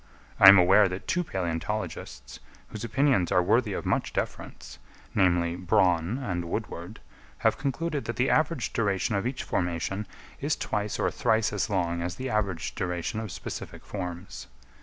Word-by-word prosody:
I 95 - +11
am 100 - +10
aware 95 +3 +6
that 90 +1 -6
two 180 +1 +1
palæontologists, 85 - -4 0.3
whose 110 - -7
opinions 115 - +2
are 90 - +4
worthy 110 +3 +2
of - - -4
much - - 0
deference, 65 +1 -5 0.3
namely 85 -2 +2
Bronn 90 +2 +2
and 90 -10 -3
Woodward, 90 +1 -5 0.4
have - - +3
concluded 145 +2 -2
that 120 - -3
the 125 +3 +1
average 155 -6 +1
duration 100 -1 0
of 100 +3 0
each 130 - -4
formation 90 +3 -2 0.3
is - - 0
twice 105 0 -2
or - - 0
thrice 110 -1 +1
as 105 - -1
long 85 -4 0
as 85 0 -3
the 130 +3 -4
average 95 -6 -1
duration 90 +5 -3
of 110 -4 -5
specific - - -7
forms. 90 -1 -6
95 Hz, 160 wpm, -27 LUFS, 90-115 Hz, 0.4 s, I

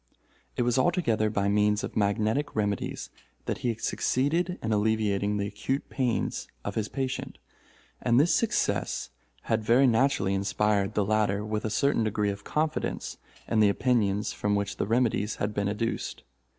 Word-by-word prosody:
It - - +2
was 120 +1 +2
altogether 130 - +2
by 100 -2 0
means 105 +1 +2
of - - -5
magnetic 110 +7 0
remedies 105 -3 -2 0.3
that - - -2
he 125 - -1
had 115 -1 -3
succeeded 165 +7 0
in 110 0 0
alleviating 105 -1 +1
the 100 - -1
acute 105 +7 -3
pains 125 -4 -1 0.2
of 100 - -2
his 105 -1 -2
patient; 135 -1 -4 0.6
and 120 0 +3
this 160 +5 +4
success 230 - 0 0.3
had 110 -1 0
very 120 +5 +5
naturally 115 -5 +2
inspired 100 0 0
the 105 - +2
latter 105 -1 +1
with 110 0 -2
a - - 0
certain 115 +3 +2
degree 105 -1 0
of 100 0 -8
confidence 155 +5 -2 0.3
in 110 - +1
the 105 -1 +6
opinions 105 -3 +1
from 105 0 0
which 100 0 -2
the - - -1
remedies 110 -2 +1
had 105 +1 -2
been 100 -1 -1
educed. 110 +3 -3
110 Hz, 165 wpm, -28 LUFS, 105-125 Hz, 0.6 s, the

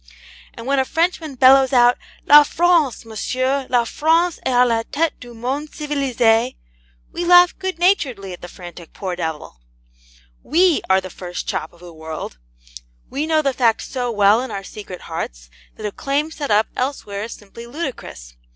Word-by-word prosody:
And 230 - -9
when 275 +1 +1
a - - +3
Frenchman 325 0 -1
bellows 265 +1 +6
out, 245 -1 +5 0.3
'LA 295 +1 +9
FRANCE, 320 -5 +1
MONSIEUR, 255 +4 -2
LA 245 -2 +3
FRANCE 325 +6 +1
EST - - -6
A 250 -1 +4
LA 230 -2 +1
TETE 320 +2 -1
DU 240 -1 -12
MONDE 270 +6 -4
CIVILISE!' 255 -5 +1 0.6
we 350 - -4
laugh 355 0 +6
good 375 -2 -3
naturedly 260 - 0
at 175 - -11
the 175 - -8
frantic 175 -2 -12
poor 185 -2 -4
devil. 160 - -5 0.8
WE 340 +2 +2
are 190 0 +4
the 185 -1 -9
first 180 0 -7
chop 155 - -3
of 170 - -21
the 175 -1 -12
world: 160 - -8 0.7
we 295 +3 -2
know 315 -1 +2
the 275 -2 +1
fact 235 -3 +1
so 250 -2 -3
well 210 +1 +4
in 260 - -5
our 195 - -5
secret 195 -3 -9
hearts - - -7 0.2
that 215 - -8
a 210 - -2
claim 285 +7 -2
set 295 -3 -5
up 215 +1 +3
elsewhere 215 -6 -3
is 230 - -8
simply 225 +3 -12
ludicrous. 240 - -7
250 Hz, 175 wpm, -20 LUFS, 200-295 Hz, 0.8 s, LA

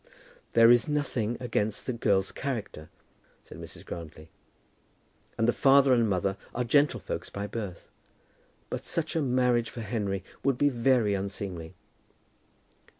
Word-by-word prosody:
"There 115 0 +7
is 120 -1 +4
nothing 125 -6 -1
against 110 -4 -2
the 130 - -2
girl's 100 -4 +1
character," 110 - -5 0.5
said - - -12
Mrs. - - -9
Grantly, 80 -2 -9 1.1
"and 115 - +2
the 120 - +3
father 135 -1 +5
and 115 -3 +3
mother 95 +1 0 0.2
are 125 - 0
gentlefolks 140 +4 +1
by 100 0 -5
birth; 105 -5 -6 0.8
but - - -3
such 165 0 -1
a 160 - +2
marriage 125 -3 +2
for 120 - -7
Henry 100 -3 -2 0.2
would 135 -2 +2
be 145 +3 +3
very 120 -4 +2
unseemly." 95 -4 -4
115 Hz, 135 wpm, -28 LUFS, 100-130 Hz, 1.1 s, There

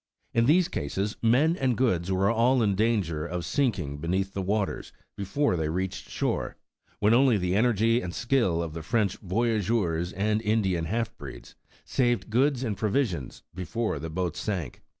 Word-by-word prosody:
In 115 0 +3
these 170 +4 +4
cases, 95 +6 -3
men 135 +9 +3
and 130 - 0
goods 95 -8 +1
were 95 +2 +2
all 120 +2 +3
in 100 -2 +2
danger 95 -7 0
of 85 0 -4
sinking 85 - -1
be 80 - -5
neath 95 +2 -1
the 100 - -2
waters 100 +1 -2 0.2
before 100 +5 0
they 80 -2 -1
reached 95 +3 -3
shore, - - -2 0.4
when 105 +2 +3
only 125 -2 +5
the 90 -1 -1
energy 115 +1 +3
and 90 - -5
skill 115 -7 +1
of 80 -2 -6
the 85 - -5
French 105 +1 0
voyageurs 100 -4 0
and 105 +3 0
In 110 0 +1
dian 90 -4 0
half 115 +6 -2
breeds - - -10 0.3
saved 120 -4 0
goods 130 +2 +2
and 110 -5 -1
provisions 105 - -1
before 100 +1 -3
the 80 +3 -5
boat 85 +1 -2
sank. 90 - -4
105 Hz, 170 wpm, -27 LUFS, 90-115 Hz, 0.4 s, only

